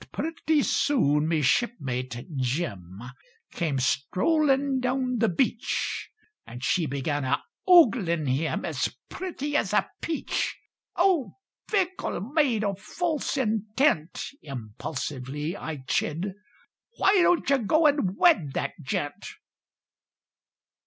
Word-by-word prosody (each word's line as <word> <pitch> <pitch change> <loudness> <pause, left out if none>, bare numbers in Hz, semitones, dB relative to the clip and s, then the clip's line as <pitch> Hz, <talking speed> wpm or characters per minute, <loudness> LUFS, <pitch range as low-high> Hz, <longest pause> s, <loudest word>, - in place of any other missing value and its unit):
But - - -16
pretty 315 -2 0
soon 150 - +2
me 160 -2 +1
shipmate 130 - -1
Jim 120 - -3 0.5
Came 155 -5 -1
strollin' 270 - +2
down 255 0 0
the 225 - +3
beach, 230 +6 -1 0.3
And 125 +2 -10
she 165 +3 +1
began 140 +1 -2
a 130 +1 0 0.2
oglin' 210 - +5
him 135 +5 -1
As - - -2
pretty 295 -6 -4
as - - +1
a - - +3
peach. 325 -2 -2 0.4
"O, 345 -7 +2 0.4
fickle 380 -3 0
maid 250 - +1
o' 200 -1 0
false 295 - -2
intent," 220 - 0
Impulsively 135 - -5
I 150 -8 -6
chid, 170 +8 -1 0.6
"Why 390 -1 +4
don't 350 -1 +3
you 275 0 +4
go 310 +9 +2
and 280 -11 +2
wed 175 - +4
that - - -1
gent?" 145 +1 -3
200 Hz, 110 wpm, -26 LUFS, -, 0.6 s, oglin